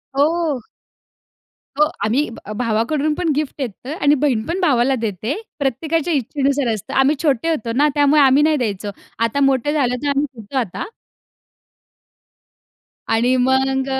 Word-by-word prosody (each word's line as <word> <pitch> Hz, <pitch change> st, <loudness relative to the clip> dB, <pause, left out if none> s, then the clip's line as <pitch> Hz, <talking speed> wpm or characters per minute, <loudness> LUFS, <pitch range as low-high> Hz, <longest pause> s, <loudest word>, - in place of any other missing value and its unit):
हो. 305 Hz, 0 st, +1 dB, 1.2 s
हो. 300 Hz, -, +6 dB, 0.2 s
आम्ही 255 Hz, +8 st, +1 dB
ब -, -, -10 dB
भावाकडून 250 Hz, +7 st, 0 dB
पण 345 Hz, +1 st, -2 dB
गिफ्ट 300 Hz, -1 st, -2 dB
घेतो. 255 Hz, +4 st, -5 dB
आणि 290 Hz, +1 st, +4 dB
बहीण 270 Hz, -5 st, +1 dB
पण 345 Hz, +3 st, -2 dB
भावाला 265 Hz, -4 st, +3 dB
देते. 220 Hz, 0 st, -3 dB, 0.3 s
प्रत्येकाच्या 315 Hz, +5 st, -1 dB
इच्छेनुसार 275 Hz, -2 st, 0 dB
असतं. 210 Hz, -, -6 dB
आम्ही 275 Hz, +3 st, +4 dB
छोटे 290 Hz, +2 st, +1 dB
होतो 235 Hz, -8 st, -1 dB
ना 295 Hz, +2 st, +5 dB
त्यामुळे 290 Hz, +1 st, +4 dB
आम्ही 275 Hz, +1 st, +5 dB
नाही 310 Hz, 0 st, +3 dB
द्यायचो. 205 Hz, -5 st, -2 dB, 0.3 s
आता 230 Hz, +4 st, 0 dB
मोठे 270 Hz, +3 st, 0 dB
झालं 255 Hz, -5 st, +1 dB
तर -, -, -1 dB
आम्ही 280 Hz, +1 st, +1 dB, 0.2 s
देतो 215 Hz, +6 st, -6 dB
आता. 220 Hz, -8 st, -3 dB, 2.3 s
आणि 240 Hz, +3 st, +3 dB
मग 265 Hz, 0 st, +1 dB
अ, 265 Hz, 0 st, -1 dB
270 Hz, 145 wpm, -19 LUFS, 240-295 Hz, 2.3 s, हो